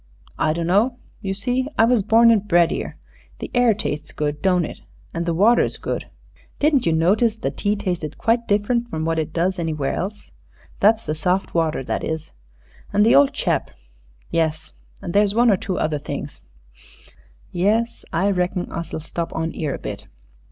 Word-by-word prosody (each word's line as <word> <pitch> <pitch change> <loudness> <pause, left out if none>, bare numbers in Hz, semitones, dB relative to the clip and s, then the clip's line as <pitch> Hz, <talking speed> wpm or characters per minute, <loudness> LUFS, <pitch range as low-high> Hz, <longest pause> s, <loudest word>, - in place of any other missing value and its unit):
"I 155 - +2
dunno. 195 +9 +1 0.2
You 195 -2 -3
see, 250 +6 -1
I 225 - +6
was 240 -2 +3
born 230 +4 +5
and 210 -2 +2
bred 170 -3 +4
'ere. - - -5 0.4
The - - -7
air 245 -3 +4
tastes 150 -8 -4
good, 150 0 -3
don't 180 -3 +2
it? - - -8 0.3
An' 170 0 -2
the 170 - 0
water's 220 +7 +3
good. - - -4 0.5
Didn't 285 - +2
you - - +3
notice 205 +8 +2
the - - -2
tea 205 0 -1
tasted 175 -7 -3
quite 235 +1 +1
different 235 +4 +1
from 160 -7 -3
what 165 0 0
it 160 0 -3
does 180 +3 0
anywhere 155 -4 -1
else? 205 +3 -5 0.5
That's 220 +2 +4
the 150 - -1
soft 180 +4 -1
water, 160 -4 0
that - - -3
is. 160 0 -4 0.6
An' 205 0 +3
the 225 - +5
old 140 0 +6
chap.... - - -1 0.6
Yes 160 - -1 0.3
and 170 - -4
there's 205 0 +3
one 235 0 +5
or 195 - +3
two 185 0 -3
other 155 -1 0
things - - -6 1.1
yes 220 +6 0
I 195 +5 +1
reckon 180 -1 -1
us'll 165 -1 -5
stop 165 +1 -4
on 160 0 -2
'ere 150 -4 -2
a - - -6
bit." - - -7
185 Hz, 180 wpm, -22 LUFS, 160-220 Hz, 1.1 s, I